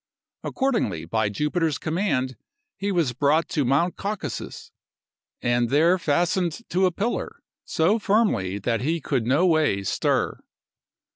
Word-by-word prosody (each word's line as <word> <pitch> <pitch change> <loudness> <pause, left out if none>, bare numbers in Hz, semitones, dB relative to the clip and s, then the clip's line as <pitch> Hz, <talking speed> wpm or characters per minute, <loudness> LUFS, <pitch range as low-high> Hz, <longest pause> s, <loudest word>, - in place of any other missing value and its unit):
Accordingly, 220 - -1
by 110 +4 0
Jupiter's 150 - 0
command, 155 -7 -1 0.4
he 200 +1 -2
was 165 -9 +1
brought 145 +6 +2
to 150 - 0
Mount 140 +8 +1
Caucasus, 195 - -5 0.7
and 120 -1 +1
there 165 +7 +4
fastened 175 +5 0
to 185 +2 +3
a - - 0
pillar, 210 +7 -3 0.2
so 185 +8 +2
firmly 200 - +1
that 115 +3 -1
he 160 +6 0
could 120 -5 -1
no 145 +8 +3
way 155 - +2
stir. - - 0
155 Hz, 130 wpm, -24 LUFS, 125-185 Hz, 0.7 s, there